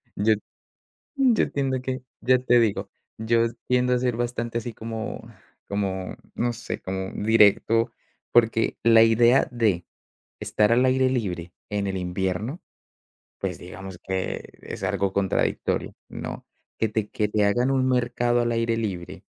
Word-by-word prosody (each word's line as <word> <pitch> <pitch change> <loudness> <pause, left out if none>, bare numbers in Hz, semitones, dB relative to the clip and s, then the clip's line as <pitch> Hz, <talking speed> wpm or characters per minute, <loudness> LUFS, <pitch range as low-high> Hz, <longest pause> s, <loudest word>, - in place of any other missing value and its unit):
yo 110 +2 +3 0.8
yo 260 -5 +3
tiendo 135 -2 -1
que 130 0 -3 0.2
ya 130 0 +4
te 120 -1 +4
digo, 110 -4 0 0.3
yo 115 +1 +2 0.2
tiendo 125 0 +2
a 125 - +2
ser 125 -1 0
bastante 120 -1 -2
así 120 0 -6
como 110 +1 -5 0.5
como 95 -2 -2 0.2
no 120 0 0
sé, 120 - -6
como 95 0 -4
directo, 110 +1 +4 0.4
porque 115 -1 +3
la 115 -1 +7
idea 120 +3 +5
de 105 -8 +1 0.6
estar 105 +1 +2
al 125 +2 +4
aire 130 0 +3
libre 90 -8 -2 0.2
en 105 -1 -1
el 95 -1 -2
invierno, 95 - -2 0.8
pues, - - -3
digamos 95 +1 -9
que 95 0 -3 0.2
es - - -7
algo 100 -1 0
contradictorio, 95 -2 0 0.2
¿no? - - -7 0.3
Que 110 - +1
te 110 -1 -2
que 105 - 0
te 105 0 +2
hagan 120 +6 +2
un 130 -1 +2
mercado 120 -1 +1
al 120 0 0
aire 115 0 +1
libre 95 -6 -4
115 Hz, 145 wpm, -25 LUFS, 100-120 Hz, 0.8 s, la